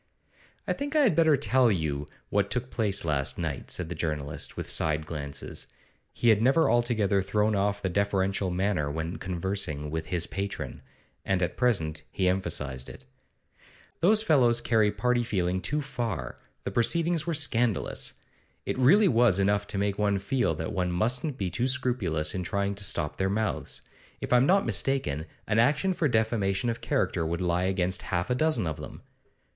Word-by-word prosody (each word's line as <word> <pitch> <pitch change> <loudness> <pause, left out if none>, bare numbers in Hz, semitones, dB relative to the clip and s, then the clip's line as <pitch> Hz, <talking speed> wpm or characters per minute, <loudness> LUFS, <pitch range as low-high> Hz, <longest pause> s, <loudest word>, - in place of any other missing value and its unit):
'I - - +1
think 285 +2 -5
I 305 - +5
had 240 -10 +4
better 160 -2 +4
tell 125 -1 +3
you 75 -6 -2 0.2
what 100 0 +1
took 125 +3 -2
place 100 -6 0
last 70 -4 0
night,' - - -4
said 90 - -2
the 85 - -4
journalist, 75 -4 -3
with - - -4
side 75 0 +1
glances. 70 -3 -5 0.4
He 120 - +1
had 110 -2 +5
never 135 +7 +4
altogether 110 -5 +2
thrown 105 +2 +1
off 100 +1 0
the - - +1
deferential 95 0 0
manner 90 -4 0
when 80 +4 -4
conversing 90 -5 -3
with 80 0 -3
his 85 -3 -1
patron, 100 +1 -5 0.4
and 95 -1 0
at 85 - -2
present 95 -11 +1
he 95 - 0
emphasised 75 -8 -1
it. 65 - -12 0.9
'Those 215 +5 +4
fellows 125 - +4
carry 110 -3 +2
party 125 +1 +1
feeling 95 -4 -1
too 150 - -1
far; 120 - -4 0.2
the - - -3
proceedings 165 - +1
were 170 - 0
scandalous. 120 -7 0 0.5
It - - -2
really 195 +12 +6
was 115 - +4
enough 100 +1 +1
to - - -3
make 100 0 -1
one 100 -1 +2
feel 100 -3 0
that 80 +1 -4
one 90 -1 0
mustn't 125 - 0
be 95 -6 -2
too 120 +2 0
scrupulous 110 -13 0
in 95 - -2
trying 100 +2 -1
to 100 +1 -4
stop 75 -5 -1
their 95 0 0
mouths. 110 +2 -2 0.4
If - - -2
I'm 125 +2 +5
not 195 +2 +4
mistaken, 85 - 0 0.2
an 110 +1 +1
action 150 +10 +3
for 165 -3 +1
defamation 110 -2 +1
of 115 - -7
character - - 0
would 85 +1 -2
lie 90 0 0
against 95 -1 0
half 90 +5 -2
a - - +4
dozen 155 - +2
of 80 -3 -3
them. - - -9
100 Hz, 175 wpm, -28 LUFS, 90-125 Hz, 0.9 s, really